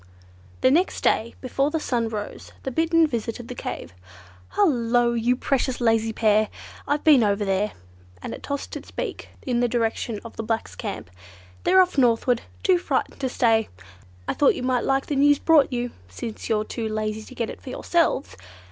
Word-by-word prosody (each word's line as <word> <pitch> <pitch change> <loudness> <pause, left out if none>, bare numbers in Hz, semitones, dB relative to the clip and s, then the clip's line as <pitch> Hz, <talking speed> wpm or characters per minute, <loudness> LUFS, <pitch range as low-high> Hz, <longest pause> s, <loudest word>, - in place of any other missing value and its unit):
The 255 - +5
next 345 +6 +2
day, 230 +2 +1
before 275 +2 0
the 320 +1 -1
sun 235 -6 -1
rose, 210 -2 -6
the 265 - -3
Bittern 330 +4 +3
visited 235 -3 -4
the - - -4
cave. 85 - -6 0.6
"Hullo, 240 - +3
you 235 +2 +2
precious 260 0 -1
lazy 225 -2 +2
pair! 215 -1 +2 0.4
I've 290 +1 0
been 290 -7 +6
over 205 0 +1
there," 195 +2 0 0.5
and - - -6
it - - -8
tossed 280 -1 -4
its - - -8
beak - - -5
in 245 -2 0
the 245 - +3
direction 230 -2 -1
of 230 - -10
the 225 - -3
blacks' 225 0 -2
camp. 200 - -6 0.5
"They're 375 +1 +7
off 360 -6 -2
northward. 240 0 +3 0.2
Too 370 -2 +4
frightened - - -2
to 260 - 0
stay. 225 -3 +2 0.6
I - - 0
thought 290 - +4
you - - -5
might 255 -2 +1
like 270 0 +1
the 290 - -2
news 290 +1 +5
brought 310 -3 +4
you, 245 -1 -2 0.2
since 215 - -7
you're 215 -1 +2
too 220 0 -4
lazy 215 0 -2
to 255 +4 -12
get 230 -3 -2
it - - -11
for - - -9
yourselves!" 330 +1 0
240 Hz, 185 wpm, -24 LUFS, 225-275 Hz, 0.6 s, They're